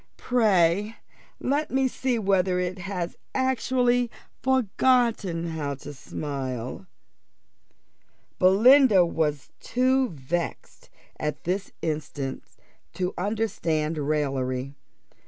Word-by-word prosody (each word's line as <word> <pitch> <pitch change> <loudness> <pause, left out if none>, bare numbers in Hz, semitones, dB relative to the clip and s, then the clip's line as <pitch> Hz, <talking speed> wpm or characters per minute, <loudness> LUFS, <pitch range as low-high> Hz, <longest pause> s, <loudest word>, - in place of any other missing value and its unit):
Pray 210 -3 +2 0.4
let 290 +3 0
me 265 0 +2
see 255 -1 -1
whether 190 -3 +2
it 180 +1 -2
has 180 -2 -4 0.2
actually 250 -2 +2 0.3
forgotten 235 -8 +2
how 150 -3 -3
to 145 +2 -9
smile." 130 +1 -5 1.5
Belinda 210 +1 +6
was 150 -4 -2
too 260 +1 +1
much 160 - -11
vexed 170 +6 -4 0.3
at 150 -1 -3
this 185 +3 -2
instant 145 -3 -3 0.5
to 180 0 -2
understand 175 -7 -1
raillery. 135 -3 -1
185 Hz, 90 wpm, -26 LUFS, 150-240 Hz, 1.5 s, Belinda